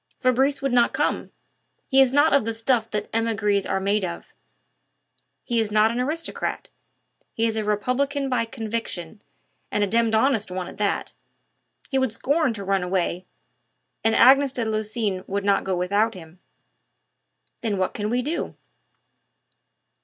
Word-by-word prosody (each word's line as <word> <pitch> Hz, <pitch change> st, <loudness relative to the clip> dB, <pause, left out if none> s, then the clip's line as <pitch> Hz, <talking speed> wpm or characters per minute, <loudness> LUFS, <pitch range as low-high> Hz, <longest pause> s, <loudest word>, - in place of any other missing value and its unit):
"Fabrice 265 Hz, +3 st, +2 dB
would 275 Hz, -2 st, 0 dB
not 240 Hz, -1 st, +3 dB
come. -, -, -1 dB, 0.6 s
He 270 Hz, 0 st, +5 dB
is 260 Hz, -2 st, +4 dB
not 290 Hz, +3 st, +4 dB
of 280 Hz, -3 st, +4 dB
the 225 Hz, +1 st, -3 dB
stuff 225 Hz, 0 st, 0 dB
that 210 Hz, 0 st, -3 dB
emigres 210 Hz, -3 st, +1 dB
are 195 Hz, -, 0 dB
made 200 Hz, +1 st, +1 dB
of. 170 Hz, -2 st, -6 dB, 1.1 s
He 235 Hz, -2 st, 0 dB
is 220 Hz, -2 st, -1 dB
not 215 Hz, +1 st, +4 dB
an 235 Hz, -, -3 dB
aristocrat; 310 Hz, +6 st, -2 dB, 0.6 s
he 225 Hz, -, 0 dB
is 225 Hz, -1 st, 0 dB
a 220 Hz, -, -1 dB
republican 255 Hz, +7 st, 0 dB
by 250 Hz, -3 st, 0 dB
conviction, 220 Hz, -5 st, -5 dB, 0.5 s
and 210 Hz, -, 0 dB
a -, -, +1 dB
demmed 230 Hz, +1 st, +2 dB
honest 220 Hz, -3 st, +2 dB
one 180 Hz, -1 st, -4 dB
at -, -, -11 dB
that. 205 Hz, -1 st, -1 dB, 0.8 s
He 270 Hz, -, +1 dB
would 260 Hz, -3 st, +1 dB
scorn 285 Hz, +5 st, +1 dB
to 200 Hz, -, -6 dB
run 195 Hz, 0 st, +1 dB
away, 180 Hz, 0 st, -1 dB, 0.8 s
and 225 Hz, 0 st, +2 dB
Agnes 275 Hz, +1 st, +6 dB
de 240 Hz, -3 st, -2 dB
Lucines 215 Hz, -3 st, -2 dB
would 200 Hz, +1 st, -2 dB
not 200 Hz, -1 st, +3 dB
go 190 Hz, -1 st, -1 dB
without 205 Hz, +5 st, +1 dB
him." 170 Hz, 0 st, -12 dB, 1.2 s
"Then 215 Hz, -4 st, -1 dB
what 185 Hz, -1 st, -1 dB
can 210 Hz, 0 st, -3 dB
we 245 Hz, +2 st, 0 dB
do?" 310 Hz, +6 st, -3 dB
225 Hz, 160 wpm, -24 LUFS, 200-255 Hz, 1.2 s, Agnes